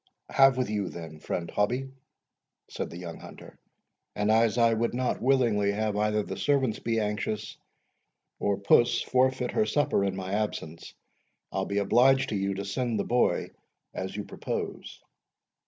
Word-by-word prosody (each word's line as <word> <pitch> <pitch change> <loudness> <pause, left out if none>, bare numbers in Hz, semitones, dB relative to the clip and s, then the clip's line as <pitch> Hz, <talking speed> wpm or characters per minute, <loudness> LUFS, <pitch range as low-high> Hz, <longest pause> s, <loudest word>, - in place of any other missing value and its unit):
"Have 135 -1 +5
with 130 - 0
you 105 -3 -2
then, 80 -2 -9
friend 85 +2 -4
Hobbie," 125 +6 0 0.8
said - - -4
the 85 - -9
young 85 -2 -7
hunter; - - -13 0.6
"and 105 +1 +1
as 115 +1 +3
I 115 -1 +4
would 115 +1 -1
not 125 0 -1
willingly 115 -6 +2
have 105 0 -1
either 105 0 +1
the 95 -1 -6
servants 130 +2 +1
be 115 -1 -1
anxious, 105 0 -3 0.8
or 100 -1 0
puss 120 +4 +3
forfeit 130 -1 +1
her 215 -1 +1
supper, 145 -8 +1
in 100 -1 -1
my 95 0 -5
absence, 95 -6 -4 0.6
I'll 95 0 -1
be 100 - -2
obliged 125 +7 +4
to - - -2
you 100 0 -1
to 100 +1 -4
send 115 +3 -1
the - - +1
boy 125 +4 +1 0.4
as 95 +1 -5
you 105 - -3
propose." - - -6
105 Hz, 160 wpm, -28 LUFS, 100-125 Hz, 0.8 s, Have